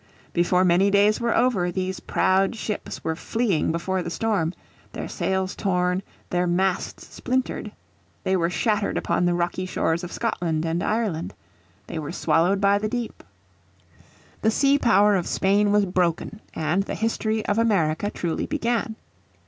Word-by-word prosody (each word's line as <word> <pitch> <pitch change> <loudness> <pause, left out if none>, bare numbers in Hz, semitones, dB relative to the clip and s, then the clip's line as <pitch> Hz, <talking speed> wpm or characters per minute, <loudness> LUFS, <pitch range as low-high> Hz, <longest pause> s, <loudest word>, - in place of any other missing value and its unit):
Before 180 +1 +3
many 180 +3 +4
days 205 +2 +3
were 235 -1 +1
over 195 -9 +2
these 185 +1 -3
proud 195 +4 +1
ships 215 -2 -5
were 160 - -1
fleeing 205 -3 0
before 185 +3 -1
the 170 - -4
storm, 195 -4 0 0.4
their - - -5
sails 190 0 -1
torn, 180 -1 0 0.3
their 180 0 +1
masts 185 +1 -1
splintered. 255 +1 -2 0.5
They 190 - +1
were 170 -2 +1
shattered 210 +2 0
upon 175 - 0
the 175 0 +2
rocky 175 +2 -1
shores 170 -1 0
of 175 - -6
Scotland 170 -8 -1
and 165 +1 -1
Ireland. 210 -7 -1 0.5
They 160 - -5
were 150 -2 -5
swallowed 180 +5 +2
by 200 0 +3
the 215 +1 -2
deep. 240 -1 -4 1.2
The 220 - +3
sea 275 +5 +3
power 210 -4 +4
of 180 -3 -1
Spain 200 +2 +2
was 205 -1 +4
broken, 180 +3 -1
and 160 +4 +1
the 195 - -4
history 220 -1 -1
of 205 +2 +1
America 200 -5 +1
truly 170 -5 -3
began. 235 -6 -1
190 Hz, 155 wpm, -24 LUFS, 175-215 Hz, 1.2 s, many